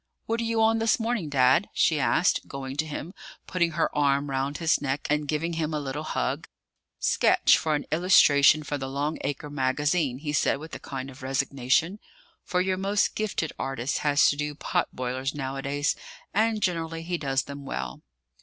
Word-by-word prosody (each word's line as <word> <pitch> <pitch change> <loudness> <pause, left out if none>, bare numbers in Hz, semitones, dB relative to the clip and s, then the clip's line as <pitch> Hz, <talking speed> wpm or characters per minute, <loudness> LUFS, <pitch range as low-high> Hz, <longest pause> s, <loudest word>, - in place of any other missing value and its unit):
What 230 +1 -1
are - - -2
you 225 -1 +1
on 225 0 +3
this 225 +1 +2
morning, 225 -8 -1
Dad?" 140 +6 +3
she 155 -2 +3
asked, 160 +5 +2
going 135 -1 -6
to 155 +1 0
him, 155 +4 -6 0.3
putting 170 -3 0
her 165 - 0
arm 140 -1 +1
round 135 +2 -1
his 165 -2 +2
neck, 140 0 -2
and 150 0 +1
giving 155 +3 -1
him 160 -1 -2
a - - 0
little 145 +1 -4
hug. 60 - -2 0.5
"Sketch - - +4
for 155 -1 0
an 145 - -3
illustration 155 -3 +5
for 145 0 -3
the 135 0 -4
Long 145 +3 -2
Acre 145 +1 -4
Magazine," 145 +1 0
he 150 +1 -4
said, 150 - +2
with 155 +3 -10
a - - -5
kind 135 0 -6
of 130 - -14
resignation; 135 +7 0 0.4
for 180 -1 0
your 185 0 0
most 200 +2 +1
gifted 210 -7 -2
artist 135 0 -2
has 145 -1 +4
to - - -3
do 150 0 -3
pot - - -1
boilers 130 +3 -3
nowadays: 140 +1 -1 0.4
and 220 0 +1
generally 165 -2 -1
he 175 0 -3
does 135 -2 0
them 140 0 -8
well. 65 - -5
150 Hz, 185 wpm, -26 LUFS, 135-170 Hz, 0.5 s, illustration